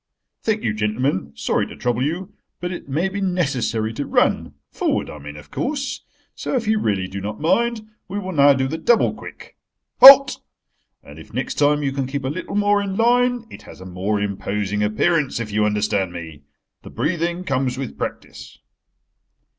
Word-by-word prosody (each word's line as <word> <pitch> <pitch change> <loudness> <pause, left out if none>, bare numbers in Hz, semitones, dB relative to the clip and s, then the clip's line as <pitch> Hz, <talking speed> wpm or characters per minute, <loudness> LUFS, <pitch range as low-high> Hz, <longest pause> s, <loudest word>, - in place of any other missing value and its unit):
Thank 220 -1 -1
you, 105 - 0
gentlemen. 105 - -1
Sorry 70 0 -1
to - - -10
trouble 120 0 -1
you, 175 +8 -3 0.3
but 175 0 -4
it 175 - -8
may 160 +8 0
be 195 +1 -4
necessary 135 - -1
to 140 +5 -4
run—forward - - -1
I 75 - -10
mean, 75 +1 -9
of 75 0 -14
course.. 275 -2 -3 0.3
So - - -4
if 235 -4 -1
you 220 0 +2
really 100 - -1
do 100 +1 -6
not 105 +2 -5
mind, 225 +7 0 0.2
we 200 - -5
will 190 -2 -4
now 145 -4 +5
do 130 0 0
the 160 +4 -4
double 230 +8 +3
quick. - - -12 0.4
Halt! 270 +1 +10 0.6
And - - -13
if - - -14
next - - -3
time 145 0 +3
you 140 - 0
can 135 -1 -2
keep 140 +1 -4
a - - -1
little 170 +6 -5
more 205 0 +3
in 195 -1 -3
line—it 245 +1 +1
has - - -13
a 95 - -10
more 95 +3 -2
imposing 105 0 -2
appearance, 130 +8 +1
if 110 -2 -5
you 105 +1 +1
understand 105 -3 0
me. 80 -4 -9 0.4
The - - -11
breathing 170 +2 -2
comes 130 -4 -1
with 135 -3 -5
practice." - - -7
140 Hz, 180 wpm, -21 LUFS, -, 0.6 s, Halt